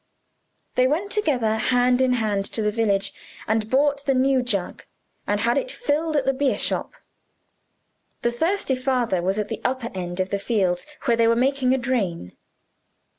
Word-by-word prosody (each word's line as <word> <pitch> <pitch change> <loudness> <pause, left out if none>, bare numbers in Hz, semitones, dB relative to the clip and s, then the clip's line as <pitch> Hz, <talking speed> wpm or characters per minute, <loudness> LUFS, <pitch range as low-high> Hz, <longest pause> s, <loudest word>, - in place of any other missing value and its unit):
They 255 0 +3
went 350 +9 -1
together 250 - +1
hand 250 +1 +2
in 255 -1 +3
hand 210 -4 0
to 220 - 0
the 210 - +1
village, 205 -3 0 0.3
and 220 0 0
bought 280 +2 +2
the 270 - +3
new 260 0 +3
jug, 205 -7 -2 0.4
and 205 0 0
had 235 +2 +2
it - - -5
filled 320 -9 -1
at 280 -3 +1
the 270 - +2
beer 275 0 +1
shop. - - -2 1.3
The 235 - +2
thirsty 325 +4 0
father 255 -7 0
was 190 +3 0
at 210 - -1
the 225 - -5
upper 255 -2 -2
end 175 -1 -5
of 185 0 -1
the 200 - 0
fields, 195 -2 0 0.2
where 235 -3 +3
they 230 -1 +4
were 230 - +4
making 260 +1 +2
a - - 0
drain. 205 - -2
245 Hz, 175 wpm, -23 LUFS, 210-270 Hz, 1.3 s, they